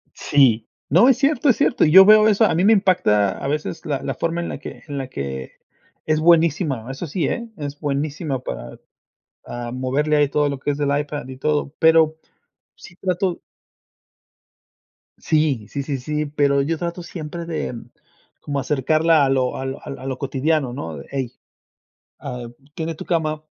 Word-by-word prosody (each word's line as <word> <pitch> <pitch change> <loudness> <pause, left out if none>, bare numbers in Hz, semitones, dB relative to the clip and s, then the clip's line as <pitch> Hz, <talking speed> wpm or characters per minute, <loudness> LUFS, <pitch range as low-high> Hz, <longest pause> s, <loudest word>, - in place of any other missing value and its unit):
Sí, 120 -6 +3 0.2
no, 180 - +6
es 260 -2 +4
cierto, 290 +1 +2
es 245 - +5
cierto. 285 - +2
Y 155 - +3
yo 190 +4 +10
veo 215 +1 +7
eso, 215 +1 +4
a 210 - +2
mí 175 - +1
me 220 - +6
impacta 175 - +2
a 135 - -4
veces 150 +3 -3
la 140 -3 -2
la 135 - -3
forma 170 +1 -2
en 170 - -4
la - - -5
que 145 - -10
en 145 -2 -5
la 130 - -4
que, 70 - -6 0.5
es 155 0 +1
buenísima, 160 - +2
eso 135 +6 -5
sí, 155 0 -2
¿eh?, 235 -1 -3
es 145 -1 -6
buenísima 145 -1 -2
para, - - -7 0.7
ah, 120 0 -6
moverle 140 +4 0
ahí 145 - +4
todo 145 0 +1
lo 140 - -4
que 145 - -1
es 140 - -4
del 145 -1 +1
iPad 145 -2 -4
y 130 -1 -9
todo. 150 0 -1
Pero 160 -1 +4 0.6
sí, 175 - -15
trato 180 -1 -1 1.8
Sí, 150 -9 0
sí, 140 - -4
sí, 135 -1 -3
sí, 150 +4 -3
pero 140 -1 +1
yo 160 +2 -2
trato 175 0 -4
siempre 170 0 -7
de 160 -6 -4 0.7
como 140 -1 -4
acercarla 155 +3 +2
a - - +1
lo 130 -2 0
al 135 0 -4
al 135 - -7
a 130 - -9
lo 130 -1 -4
cotidiano, 140 -1 0
¿no?, 80 -8 -6
de: 70 - -10
"Ey, 135 -3 -3 0.9
ah, 125 -1 -6 0.3
tiende 165 0 -4
tu - - -9
cama, 155 -2 -1
150 Hz, 185 wpm, -21 LUFS, 135-165 Hz, 1.8 s, yo